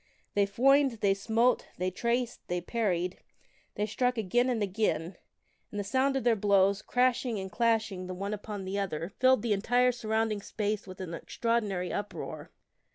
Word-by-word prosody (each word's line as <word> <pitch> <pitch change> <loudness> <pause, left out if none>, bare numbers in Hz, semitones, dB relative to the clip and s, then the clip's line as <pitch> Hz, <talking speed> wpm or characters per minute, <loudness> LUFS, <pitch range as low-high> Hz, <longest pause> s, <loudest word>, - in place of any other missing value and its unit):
They 200 -1 +3
foined, 265 +3 +3
they 200 -1 +4
smote, 225 +5 +1
they 185 +1 -1
traced, 235 +5 -1
they 180 0 -1
parried, 180 -2 -1 0.6
they 210 - 0
struck 250 +4 0
again 240 +5 +2
and 230 -4 0
again, 190 -4 -1 0.5
and 205 - -5
the - - -1
sound 260 +6 +1
of 270 - 0
their 235 -2 +4
blows, 200 -1 +3
crash 250 0 +2
ing 235 -5 -2
and 190 0 -6
clashing 220 -5 0
the 185 - -5
one 200 +3 -3
upon 205 -1 -6
the 195 +2 -2
other, 175 -2 -3
filled 260 0 +4
the 230 -3 +2
entire 245 +5 +3
surrounding 220 -3 -1
space 210 0 -3
with 185 0 -9
an 175 -3 -5
extraordinary 205 -2 -1
uproar. 205 0 -5
210 Hz, 170 wpm, -30 LUFS, 195-235 Hz, 0.6 s, they